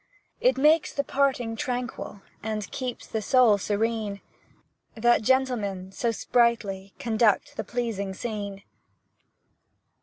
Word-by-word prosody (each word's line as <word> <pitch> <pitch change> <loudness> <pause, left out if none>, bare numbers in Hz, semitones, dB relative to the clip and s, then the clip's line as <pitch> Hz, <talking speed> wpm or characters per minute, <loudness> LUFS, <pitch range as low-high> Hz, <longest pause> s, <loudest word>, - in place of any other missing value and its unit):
It 255 +1 +3
makes 300 +3 +4
the 280 - -1
parting 265 -5 0
tranquil 245 -4 -4 0.2
And 215 -2 -4
keeps 255 -2 -4
the 220 - -3
soul 225 -2 +5
serene, 210 0 -1 0.8
That 240 +1 +3
gentlemen 215 -7 0
so 235 +4 -1
sprightly 225 -5 +1
Conduct 230 +5 +1
the - - -3
pleasing 215 -6 -3
scene! 205 -3 -5
225 Hz, 110 wpm, -26 LUFS, 205-250 Hz, 0.8 s, soul